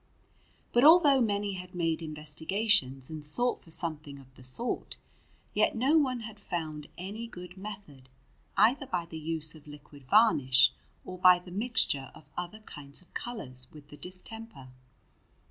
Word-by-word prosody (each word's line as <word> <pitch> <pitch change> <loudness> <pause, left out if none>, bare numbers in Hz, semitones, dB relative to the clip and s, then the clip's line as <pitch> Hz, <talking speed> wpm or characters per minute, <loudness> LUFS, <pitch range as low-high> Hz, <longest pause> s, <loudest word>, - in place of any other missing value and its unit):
But 240 - +4
although 300 -4 +7
many 205 -3 0
had 180 -1 -8
made 165 -2 0
investigations 155 - 0
and 155 -1 -6
sought 245 +12 +1
for - - -16
something 155 -4 0
of 130 -1 -16
the 130 - -16
sort, 130 - -1 0.6
yet - - +2
no 265 +7 +3
one 260 -6 +2
had 220 -1 -9
found 155 -6 -4
any 205 +6 -6
good 180 -4 -10
method, 190 -10 -9 0.5
either 265 +4 +4
by 175 -5 -2
the 160 -1 -8
use 155 -1 -1
of 155 -2 -16
liquid 145 -1 -13
varnish 135 - +5 0.3
or 185 0 -8
by 180 0 +7
the 180 0 -12
mixture 200 - 0
of - - -17
other 180 +5 -5
kinds 145 -4 -6
of - - -24
colours 130 - -3
with 150 -1 -15
the 150 - -12
distemper. 185 - -5
175 Hz, 155 wpm, -30 LUFS, 150-215 Hz, 0.6 s, although